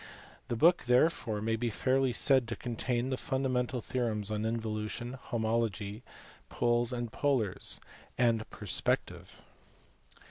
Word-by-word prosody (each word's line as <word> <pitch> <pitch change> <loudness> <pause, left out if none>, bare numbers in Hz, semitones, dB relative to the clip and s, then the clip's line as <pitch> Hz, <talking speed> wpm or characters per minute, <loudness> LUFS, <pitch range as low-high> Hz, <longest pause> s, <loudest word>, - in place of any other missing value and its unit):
The 120 - -2
book 170 +8 +4
therefore 125 -4 +2
may 115 0 +1
be 120 +1 -1
fairly 130 +3 +1
said 130 0 +3
to 115 - -3
contain 120 +1 -2
the 130 - 0
fundamental 130 -2 -1
theorems 110 -5 -1
on 105 0 -1
involution, 110 +1 -3
homology, 110 -3 -1 0.5
poles 120 0 +1
and 120 -2 -3
polars, 125 -10 +1 0.4
and 115 -3 +2
per - - -10
spective. - - -1
120 Hz, 120 wpm, -31 LUFS, 110-130 Hz, 0.5 s, book